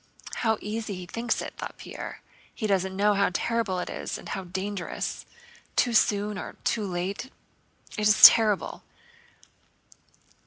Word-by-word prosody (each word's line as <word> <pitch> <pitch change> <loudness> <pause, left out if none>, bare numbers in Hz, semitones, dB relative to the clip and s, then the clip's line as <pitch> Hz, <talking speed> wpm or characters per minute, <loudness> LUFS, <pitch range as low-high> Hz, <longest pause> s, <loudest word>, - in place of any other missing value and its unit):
"How 220 -2 +1
easy 215 -1 -4
he 180 0 -7
thinks 230 +7 -2
it," - - -7
thought - - -6
Pierre. - - -8 0.3
"He 220 - -4
doesn't 190 -2 0
know 205 +2 +3
how 200 -1 +2
terrible 230 -1 -1
it 180 - -3
is - - -5
and - - -10
how 190 - -4
dangerous. 190 +1 -4 0.5
Too 245 - +2
soon 210 -2 +2
or - - -7
too 215 -3 0
late... 185 +5 -3 0.7
it 210 - +3
is 210 - +3
terrible!" 215 -4 +7
205 Hz, 145 wpm, -27 LUFS, 190-220 Hz, 0.7 s, terrible